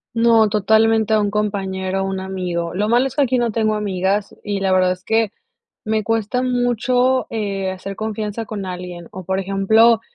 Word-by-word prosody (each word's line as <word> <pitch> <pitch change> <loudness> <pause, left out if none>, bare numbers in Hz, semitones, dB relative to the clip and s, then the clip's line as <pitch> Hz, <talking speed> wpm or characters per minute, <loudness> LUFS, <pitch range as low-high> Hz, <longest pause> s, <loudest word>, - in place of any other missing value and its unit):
No, 230 -1 +5
totalmente 220 +1 +3
a - - +3
un 205 -1 0
compañero, 195 -2 -2
un 195 0 -3
amigo. 180 -3 -3
Lo 210 +3 0
malo 245 +3 +3
es 270 - -9
que 290 - +3
aquí 255 -1 +1
no 235 -1 +1
tengo 215 0 +1
amigas 200 -1 -1
y, 205 -1 -2
la 195 -1 0
verdad, 185 -1 +3
es 180 0 -5
que 220 0 +1 0.5
me 215 0 0
cuesta 225 +3 0
mucho, 250 +1 +1
eh, 195 -3 -2
hacer 190 +1 -7
confianza 220 +1 -4
con 205 -2 -5
alguien 180 -1 -7
o, 185 - -8
por 190 +1 -1
ejemplo, 220 +4 +3
210 Hz, 185 wpm, -20 LUFS, 190-225 Hz, 0.5 s, No